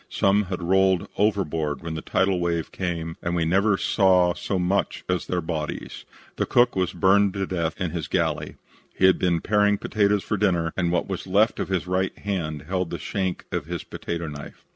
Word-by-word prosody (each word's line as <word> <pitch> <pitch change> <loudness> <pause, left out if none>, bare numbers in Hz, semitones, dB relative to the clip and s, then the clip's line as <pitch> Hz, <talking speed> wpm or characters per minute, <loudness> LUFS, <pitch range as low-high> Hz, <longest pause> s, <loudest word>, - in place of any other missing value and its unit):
Some 100 +1 +2
had 90 -1 -4
rolled 95 0 +3
overboard 80 -8 0
when 85 -1 -4
the 80 - -4
tidal 95 -1 +1
wave 85 -2 -1
came 85 -3 -4
and 85 0 -2
we 85 -1 +1
never 100 +4 +3
saw 90 -4 +3
so 95 - -3
much 95 +2 0
as 90 -1 -1
their 90 -1 -1
bodies. 80 -2 -5 0.3
The - - 0
cook 120 0 +3
was 95 -2 0
burned 95 +2 +3
to 100 -1 -1
death 85 -4 -2
in 90 -3 -1
his 80 -5 -4
galley. - - -1 0.4
He 95 - +3
had 95 - +5
been 85 -3 +1
paring 105 -1 +3
potatoes 100 -1 +1
for 105 - -1
dinner 85 -5 +1
and 85 -2 0
what 90 - 0
was 95 -1 -5
left 105 +4 +2
of - - -1
his 95 -3 -1
right 95 +1 -1
hand 80 -8 -3
held 90 +1 -2
the - - -4
shank 95 -2 -3
of 90 -5 -3
his 85 -1 -4
potato 85 0 -5
knife. 75 -1 -9
90 Hz, 200 wpm, -24 LUFS, 85-95 Hz, 0.4 s, had